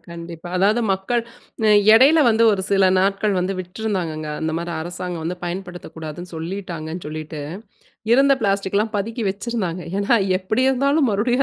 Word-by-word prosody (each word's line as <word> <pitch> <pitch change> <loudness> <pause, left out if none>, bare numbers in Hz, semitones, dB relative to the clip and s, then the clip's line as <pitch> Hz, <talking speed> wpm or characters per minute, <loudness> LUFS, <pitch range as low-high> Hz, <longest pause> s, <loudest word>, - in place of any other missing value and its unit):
கண்டிப்பா. 170 0 -8
அதாவது 205 +5 +3
மக்கள் 195 +6 -1 0.5
அ - - +5 0.3
எடையில 275 +8 +6
வந்து 230 0 +3
ஒரு 190 -2 -1
சில 195 -1 +4
நாட்கள் 195 +1 +1
வந்து 180 +2 -1
விட்டுருந்தாங்கங்க. 180 -5 -3
அந்தமாரி 165 +2 -2
அரசாங்கம் 175 0 -5
வந்து 175 +2 -3
பயன்படுத்தக்கூடாதுன்னு 175 -2 -7
சொல்லிட்டாங்கன்னு 170 -1 -5
சொல்லிட்டு. 155 0 -6 0.7
இருந்த 275 +2 +5
பிளாஸ்டிக்லாம் 200 +2 0
பதுக்கி 225 +4 -3
வச்சிருந்தாங்க. 195 -3 -3
ஏன்னா, 200 +3 +2 0.2
எப்பிடி 215 +7 -1
இருந்தாலும் 275 +2 +2
மறுபடியும் 240 +6 +1
190 Hz, 130 wpm, -21 LUFS, 170-220 Hz, 0.7 s, எடையில